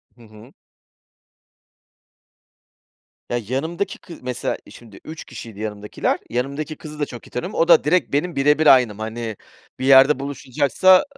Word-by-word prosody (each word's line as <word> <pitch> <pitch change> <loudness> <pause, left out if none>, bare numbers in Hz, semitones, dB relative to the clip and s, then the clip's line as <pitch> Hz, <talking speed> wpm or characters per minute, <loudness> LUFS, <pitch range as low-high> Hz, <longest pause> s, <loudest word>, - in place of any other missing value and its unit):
Hı 120 - -20
hı. 110 +4 -16 2.8
Ya 120 - 0
yanımdaki 160 - -3
kı 170 - -12
mesela 125 -1 -3
şimdi 110 -5 -14
3 160 0 -8
kişiydi 110 -3 -10
yanımdakiler. 105 -1 -2
Yanımdaki 140 +6 -3
kızı 150 -1 -10
da 145 - +1
çok 120 -4 -11
iyi - - -16
tanıyorum. 125 - -5
O 165 - +3
da 170 -2 +6
direk 175 0 +1
benim 170 +4 0
birebir 150 +3 +3
aynım. 120 -5 +5
Hani, 110 0 -5 0.4
bir 130 - -2
yerde 135 +1 +6
buluşacaksa 140 +4 0
a - - 0
135 Hz, 145 wpm, -21 LUFS, 115-150 Hz, 2.8 s, da